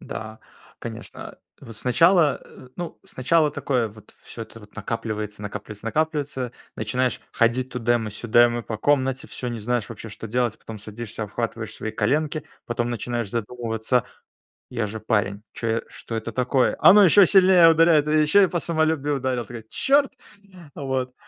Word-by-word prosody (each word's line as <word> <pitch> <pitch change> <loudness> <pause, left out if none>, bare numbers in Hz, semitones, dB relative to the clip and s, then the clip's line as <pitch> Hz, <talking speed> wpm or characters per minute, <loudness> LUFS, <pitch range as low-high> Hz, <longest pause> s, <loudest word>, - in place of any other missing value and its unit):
Да, 110 0 -7 0.4
конечно, - - -9 0.2
вот 115 -2 -11
сначала, 160 - +3
э, 130 - -15
ну, 175 -1 -6
сначала 150 +4 +1
такое 125 -5 -1
вот: 105 0 -16
всё 115 - -8
это 115 0 -12
вот 105 -1 -17
накапливается, 110 -1 -4
накапливается, 105 +1 -7
накапливается, 145 -2 -1 0.2
начинаешь 125 +4 -1
ходить 120 +2 +1
тудэмэ-сюдэмэ 120 0 +2
по 110 -1 -5
комнате, 135 0 +1
всё, 125 - -5
не 120 -1 -4
знаешь 120 0 -1
вообще, 115 - -9
что 110 +1 -8
делать. 120 0 -1
Потом 110 -1 -9
садишься, 110 +1 -7
обхватываешь 110 +1 -4
свои 110 - -5
коленки, 150 +7 -1 0.2
потом 120 0 -2
начинаешь 120 -2 -3
задумываться: 115 +1 -1 0.7
"Я 115 -4 -2
же 110 +2 -6
парень, 105 -2 -1
чё 115 - -4
я 115 +1 0
что 115 - -8
это 115 +1 -4
такое?" 125 +2 +1
Оно 205 +1 +8
ещё 195 +2 +7
сильнее 185 -3 +7
ударяет, 165 -2 +4
и 155 0 +3
ещё 155 +7 +5
и - - +4
по 175 - -2
самолюбию 155 -3 +1
ударило! 130 -2 -2
Такой: 115 +1 -9
"Чёрт!". 280 0 +2 0.6
Вот. 130 -2 -3
120 Hz, 155 wpm, -23 LUFS, 110-145 Hz, 0.7 s, Оно